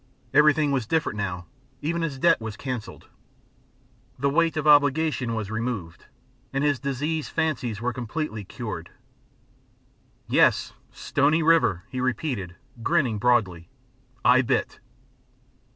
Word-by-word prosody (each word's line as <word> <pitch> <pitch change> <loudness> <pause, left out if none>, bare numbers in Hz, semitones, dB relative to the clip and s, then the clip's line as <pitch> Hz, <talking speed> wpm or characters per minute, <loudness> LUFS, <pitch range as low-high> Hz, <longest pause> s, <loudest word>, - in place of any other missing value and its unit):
Everything 150 -1 +4
was 130 -5 -1
different 160 -7 0
now, 95 -4 -4 0.4
even 170 +3 -1
his 150 -5 -3
debt 165 -1 +3
was 110 -2 -6
canceled, 125 -5 -6 1.1
the 140 +2 0
weight 165 +1 +2
of 155 - -1
obligation 145 -4 +3
was 110 -2 -4
removed, 110 -7 -4 0.5
and 135 +1 -1
his 145 -4 +1
diseased 145 +3 -2
fancies 125 -9 -2
were 125 +1 -1
completely 120 -1 -4
cured. - - -7 1.4
"Yes! - - +3 0.2
Stony 150 +3 +1
River," 155 - +3
he 130 +1 -4
repeated, 120 - -2 0.3
grinning 130 -7 +1
broadly. 100 -8 +1 0.6
"I - - +6
bit!" - - -1
130 Hz, 120 wpm, -25 LUFS, 110-155 Hz, 1.4 s, I